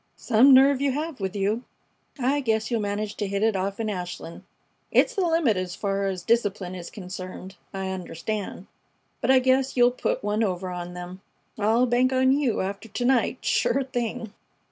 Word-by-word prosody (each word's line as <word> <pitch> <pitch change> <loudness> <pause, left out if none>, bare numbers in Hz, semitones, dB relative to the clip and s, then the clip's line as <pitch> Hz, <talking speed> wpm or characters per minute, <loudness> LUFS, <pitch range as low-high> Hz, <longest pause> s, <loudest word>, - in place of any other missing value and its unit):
"Some 250 +3 +5
nerve 270 +1 +6
you 280 -2 +1
have 305 -1 -4
with 190 0 -3
you. 205 +4 0 0.6
I 270 +3 +1
guess 220 -3 0
you'll 230 -2 +1
manage 205 +1 -2
to 205 - -2
hit 200 +1 -1
it 220 -2 +2
off 195 +2 -2
in 225 - -1
Ashland. 175 -4 -5 0.5
It's - - +3
the 405 - -1
limit 325 - +2
as 185 -1 -3
far 195 -1 -1
as 185 -2 -3
discipline 205 -4 0
is 175 -2 -7
concerned, 185 -1 -8 0.2
I 190 -1 -4
understand, 190 +2 -5 0.6
but 245 - -1
I 265 - +7
guess 260 +1 +2
you'll 245 0 +6
put 250 - -2
one 210 +2 0
over 185 -3 -1
on 175 0 -6
them. 180 +1 -8 0.4
I'll 225 +4 +3
bank 250 +1 +2
on 260 0 +3
you 275 -4 +1
after 200 +4 -5
to 245 +4 -3
night, 250 -2 +1
sure 230 +4 +2
thing!" 240 -4 -4
215 Hz, 185 wpm, -25 LUFS, 190-255 Hz, 0.6 s, I